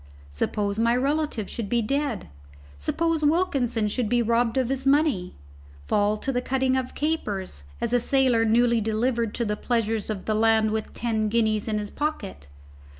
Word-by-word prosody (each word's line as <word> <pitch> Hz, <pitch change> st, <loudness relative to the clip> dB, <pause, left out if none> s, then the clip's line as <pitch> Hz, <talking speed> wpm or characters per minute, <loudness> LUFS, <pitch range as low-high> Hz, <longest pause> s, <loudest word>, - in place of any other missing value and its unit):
Suppose 200 Hz, -, -2 dB
my 230 Hz, +1 st, +3 dB
relative 275 Hz, -4 st, -1 dB
should 220 Hz, -4 st, -5 dB
be 235 Hz, -1 st, +1 dB
dead? 275 Hz, -, -2 dB, 0.5 s
Suppose 330 Hz, -, 0 dB
Wilkinson 280 Hz, -, +1 dB
should 220 Hz, +1 st, -1 dB
be 240 Hz, -1 st, +2 dB
robbed 230 Hz, +1 st, +1 dB
of 255 Hz, -2 st, +1 dB
his 270 Hz, 0 st, -1 dB
money? 275 Hz, -, +2 dB, 0.5 s
fall 205 Hz, -, +1 dB
to 270 Hz, -, -3 dB
the 250 Hz, -1 st, -1 dB
cutting 260 Hz, 0 st, 0 dB
of 260 Hz, -1 st, -3 dB
capers, 205 Hz, -, -3 dB
as 235 Hz, -, -2 dB
a 245 Hz, -, +4 dB
sailor 255 Hz, -2 st, +2 dB
newly 235 Hz, +1 st, +3 dB
delivered 225 Hz, +1 st, 0 dB
to 235 Hz, -, -1 dB
the 210 Hz, -1 st, -1 dB
pleasures 225 Hz, -2 st, -1 dB
of 205 Hz, -3 st, -4 dB
the 215 Hz, -, 0 dB
land 220 Hz, 0 st, +3 dB
with 220 Hz, 0 st, -3 dB
ten 220 Hz, -2 st, -1 dB
guineas 220 Hz, -1 st, +1 dB
in 215 Hz, -1 st, 0 dB
his 210 Hz, -1 st, -4 dB
pocket? 260 Hz, -, -4 dB
230 Hz, 170 wpm, -25 LUFS, 215-265 Hz, 0.5 s, a